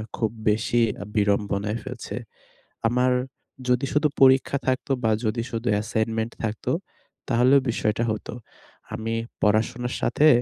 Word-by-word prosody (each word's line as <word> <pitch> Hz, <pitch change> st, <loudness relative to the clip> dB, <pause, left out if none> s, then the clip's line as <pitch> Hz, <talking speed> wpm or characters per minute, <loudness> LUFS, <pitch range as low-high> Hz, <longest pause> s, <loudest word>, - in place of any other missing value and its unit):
খুব 110 Hz, -2 st, 0 dB, 0.2 s
বেশি 115 Hz, +2 st, +2 dB, 0.2 s
আ -, -, -3 dB
বিড়ম্বনায় 105 Hz, +1 st, +1 dB
ফেলছে। -, -, -6 dB, 0.7 s
আমার 125 Hz, +2 st, +2 dB, 0.6 s
যদি 125 Hz, +2 st, +2 dB
শুধু 150 Hz, +1 st, +3 dB
পরীক্ষা 130 Hz, +1 st, +5 dB
থাকতো 130 Hz, +1 st, 0 dB
বা 110 Hz, -, +3 dB
যদি 110 Hz, +2 st, 0 dB
শুধু 115 Hz, +1 st, -3 dB
অ্যাসাইনমেন্ট 110 Hz, +2 st, -1 dB
থাকতো 110 Hz, -1 st, -2 dB, 0.6 s
তাহলেও 130 Hz, +3 st, +5 dB
বিষয়টা 110 Hz, 0 st, 0 dB
হতো। 110 Hz, -, -5 dB, 0.6 s
আমি 110 Hz, +1 st, -3 dB, 0.3 s
পড়াশোনার 115 Hz, +4 st, +1 dB
সাথে 150 Hz, +5 st, +3 dB
115 Hz, 120 wpm, -25 LUFS, 110-125 Hz, 0.7 s, পরীক্ষা